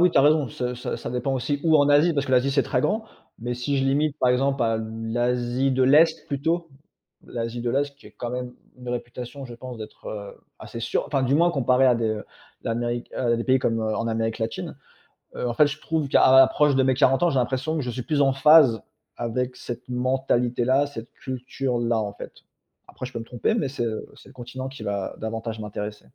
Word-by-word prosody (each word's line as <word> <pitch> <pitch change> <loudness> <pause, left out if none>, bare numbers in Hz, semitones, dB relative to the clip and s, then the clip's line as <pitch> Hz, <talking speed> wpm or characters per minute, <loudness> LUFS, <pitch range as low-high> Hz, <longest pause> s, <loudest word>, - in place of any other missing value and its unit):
oui, 180 - +6
tu - - +3
as - - +8
raison, 150 -2 +4
ça 125 +1 -3 0.2
ça - - -6
dépend 125 +2 -1
aussi 135 +3 -1
où 160 -1 +5
en 145 - +4
Asie, 150 +4 +5
parce 145 -1 -1
que 130 - -2
l'Asie, 130 +2 +4
c'est 140 0 +2
très 125 - 0
grand. 220 +1 0 0.3
Mais 120 +1 -3
si 135 +3 -1
je 135 - +1
limite, 140 +2 +1
par 125 - +3
exemple, 135 +1 +2
à 115 -1 +1
l'Asie 120 +4 -1
de 130 0 +2
l'Est, 160 +5 +4
plutôt, 165 +4 -1 0.6
l'Asie 115 0 -4
de 120 - -1
l'Est 140 +1 -1
qui - - -17
est - - -18
quand 120 - -6
même 125 0 -4 0.2
une 125 -1 -10
réputation, 125 +3 -6
je 120 - -9
pense, 125 -1 -9
d'être, 110 - -9
heu, 100 -2 -7 0.2
assez 115 - -8
sûre 115 - -1
enfin 135 -3 0
du 130 +2 +2
moins, 170 +3 +4
comparé 130 -3 +3
à 125 - +5
des 110 -2 -1 0.4
l'Amérique, 120 +1 -2
heu, 120 -2 +1
pays 130 0 +4
comme, 115 -3 0
heu, 110 -1 -1
en 115 - -2
Amérique 115 0 -1
latine. 110 0 -4 0.6
Heu, - - -3
en - - -2
fait, 150 +4 +5
je 150 +2 -6
trouve 160 -3 -1
qu'à 130 - +5
l'approche 135 +2 +6
de 135 - +3
mes 130 0 +3
40 135 +3 +3
ans, 175 - +4
j'ai 135 - +1
l'impression 130 +5 -1
que 155 - 0
je 125 - -4
suis 125 +1 -4
plus 145 +3 +1
en 135 -1 +4
phase 135 -4 +6 0.4
avec 125 +2 -2
cette 120 0 -7
mentalité-là, 130 +1 +1
cette 115 -4 -9
culture-là, 125 -2 -2
en 105 -2 -3
fait. - - -9 0.6
Après, - - -8
je 125 - -8
peux 120 - -5
me 115 - -7
tromper, 125 - -1
mais 150 - 0
c'est, 130 -2 -3
heu, 110 -2 -4
c'est - - -16
le - - -17
continent 130 +2 -7
qui 135 - -10
va, 100 -2 -3
heu, - - -20
davantage 110 0 -4
m'intéresser. 105 -2 -6
125 Hz, 225 wpm, -24 LUFS, 120-140 Hz, 0.6 s, as